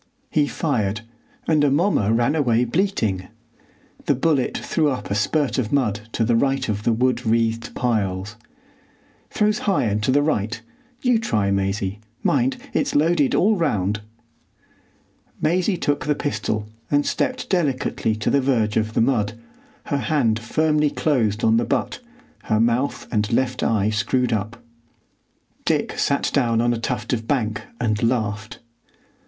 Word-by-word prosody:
He 150 -2 +2
fired, 110 - -1 0.5
and 155 -2 +3
Amomma 145 - +2
ran 120 +4 +2
away 125 -6 +2
bleating. 115 - -1 0.8
The 145 - +3
bullet 140 -1 +1
threw 155 -3 0
up 130 -6 -4
a - - +2
spurt 135 +7 +1
of 110 -4 -2
mud 110 -6 0
to 115 - +1
the 120 - +2
right 135 +2 +1
of 105 -1 -2
the 115 - +1
wood 125 +1 +1
wreathed 115 0 0
piles. 105 -4 -1 0.9
"Throws 210 0 +1
high 195 - +2
and 105 -2 0
to 110 - -1
the 145 +2 +3
right. 115 -6 -1 0.4
You 250 -3 +3
try, 105 - 0
Maisie. 100 +1 -1 0.2
Mind, 130 -1 +2 0.2
it's - - 0
loaded 150 -1 +3
all 215 +3 +3
round." 105 - 0 1.4
Maisie 180 +4 +1
took 145 -2 -1
the 150 - +2
pistol 110 -7 -2 0.2
and 145 0 +2
stepped 255 - -1
delicately 135 - 0
to 105 - -1
the 140 - +3
verge 115 -6 +1
of 110 0 -1
the - - +3
mud, 115 -4 +1 0.5
her 145 -3 -1
hand 125 -6 +1
firmly 150 +5 +1
closed 115 -9 0
on 110 0 +4
the 120 - +2
butt, 115 - -1 0.5
her 110 -1 +1
mouth 120 +4 +1
and 105 -1 0
left 125 +1 0
eye 110 -1 +1
screwed 115 +3 0
up. 110 +2 -3 1.0
Dick - - 0
sat - - +1
down 115 -2 +2
on 120 +1 +2
a 115 - -3
tuft 125 +3 -2
of 115 -2 -3
bank 110 -6 0 0.2
and 110 -3 0
laughed. 110 -3 -1
120 Hz, 150 wpm, -22 LUFS, 110-145 Hz, 1.4 s, on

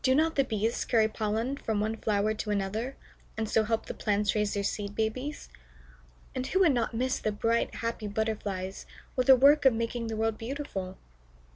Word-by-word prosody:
Do 260 0 +4
not 320 +2 +3
the 275 - +4
Bees 225 -1 -1
carry 220 -2 +3
pollen 220 +5 -2
from 220 -6 -2
one 215 +2 0
flower 215 -1 +1
to 215 0 -5
another, 210 +6 -2 0.4
and 220 0 -1
so 220 - +3
help 225 +1 -1
the - - -5
plants 205 -1 +1
raise 210 -1 0
their 200 - -1
Seed 200 0 -3
Babies? 255 +7 -2 0.9
And 255 0 -3
who 380 - +2
would 335 -7 +5
not 230 -2 -1
miss 255 +3 0
the 215 - -1
bright, 230 +3 0
happy 230 -2 -3
Butterflies, 200 -3 -3 0.3
with 255 -1 +1
their 265 - +10
work 285 +4 +6
of 265 -3 +6
making 230 +1 -2
the 225 - -3
world 220 0 0
beautiful? 225 -7 -5
225 Hz, 190 wpm, -29 LUFS, 210-255 Hz, 0.9 s, their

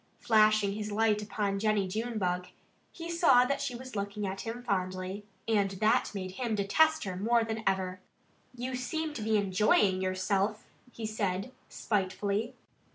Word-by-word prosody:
Flashing 215 -2 +4
his 210 0 -4
light 215 0 +2
upon 205 -1 -2
Jennie 210 -2 +1
Junebug 185 -4 -2 0.4
he 335 -1 -8
saw 325 -8 +5
that 275 +2 -1
she 250 -3 -2
was 255 0 -9
looking 200 +1 -3
at 195 0 -4
him 235 +2 -6
fondly. 185 -1 -2 0.2
And 205 -3 +2
that 215 +3 +2
made 185 -1 -4
him 230 +2 -2
detest 315 +11 +3
her 190 -2 -4
more 230 +5 +2
than 225 0 -3
ever. 185 -1 0 0.6
"You 250 +1 -4
seem 310 +5 -3
to 245 - -5
be 220 0 +2
enjoying 195 -1 +3
yourself," 190 +3 0 0.3
he 230 - -6
said 205 0 -2 0.2
spitefully. 205 +2 -1
210 Hz, 155 wpm, -30 LUFS, 195-230 Hz, 0.6 s, saw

